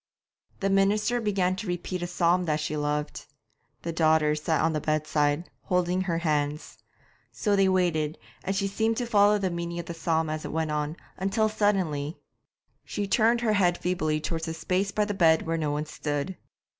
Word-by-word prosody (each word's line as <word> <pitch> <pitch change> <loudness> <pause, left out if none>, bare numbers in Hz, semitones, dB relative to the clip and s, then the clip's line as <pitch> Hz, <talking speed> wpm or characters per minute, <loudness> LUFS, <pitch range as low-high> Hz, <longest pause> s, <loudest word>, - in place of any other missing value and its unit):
The 195 - +1
minister 210 +5 +2
began 190 -4 +1
to 200 - -5
repeat 175 +1 -3
a 175 - -2
psalm 175 0 +2
that 155 -2 0
she 150 0 -2
loved. 150 0 -2 0.6
The 170 - -3
daughters 155 -2 +3
sat 160 -1 +1
on 160 0 +2
the 155 - -1
bedside, 155 +1 0
holding 180 0 +1
her 175 -3 -1
hands. 150 -2 -1 0.5
So 205 -2 0
they 195 -1 +4
waited, 165 -5 +1 0.3
and 195 +1 -1
she 195 0 0
seemed 220 +3 0
to 245 - -1
follow 210 -2 +4
the 190 -3 -1
meaning 170 0 -4
of 170 - -4
the 170 - -5
psalm 160 -1 0
as 155 0 -3
it - - -5
went 160 -1 -1
on, 150 +2 -2 0.2
until 205 +3 +1
suddenly 185 -8 0 0.7
She 205 -1 -3
turned 230 +3 +3
her 220 -3 +2
head 180 -4 +3
feebly 155 -4 0
towards 165 +1 -3
a 160 - -3
space 185 +4 0
by 210 +1 0
the 205 - -2
bed 165 -5 +4
where 165 0 -1
no 155 -2 -1
one 150 +1 -1
stood. 150 +3 -3
170 Hz, 190 wpm, -27 LUFS, 155-195 Hz, 0.7 s, they